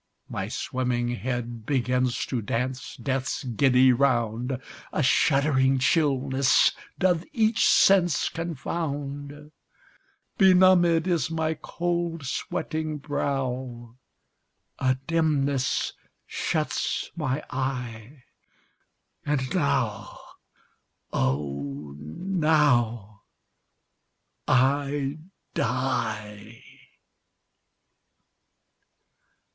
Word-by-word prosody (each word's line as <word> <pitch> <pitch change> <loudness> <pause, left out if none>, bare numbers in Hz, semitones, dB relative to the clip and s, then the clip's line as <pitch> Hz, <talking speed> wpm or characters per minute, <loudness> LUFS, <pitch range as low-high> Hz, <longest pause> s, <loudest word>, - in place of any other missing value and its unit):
My - - -3
swimming 125 -2 -2
head 120 -1 -4
begins 125 -2 0
to 125 -3 -2
dance 125 +5 -3
death's 135 +2 -2
giddy 130 +1 +4
round; 120 -1 +1 0.3
A 155 - 0
shuddering 135 0 +3
chillness 135 -2 +3 0.3
doth 180 -3 +2
each 225 -2 +3
sense 180 -4 +4
confound; 145 -2 -5 0.9
Benumbed 180 -3 +5
is 175 -4 0
my 160 -1 -1
cold 170 -1 -3
sweating 155 +4 -3
brow 130 -5 -3 0.8
A 130 -1 +2
dimness 145 -5 +1 0.3
shuts - - -2
my 145 -3 -2
eye. 125 -1 -4 1.0
And 135 -3 -1
now, 70 - -1 0.9
oh! 70 +1 -2
now, 120 - +1 1.3
I 140 +2 +1 0.3
die! 110 -3 -3
135 Hz, 65 wpm, -26 LUFS, 120-155 Hz, 1.3 s, Benumbed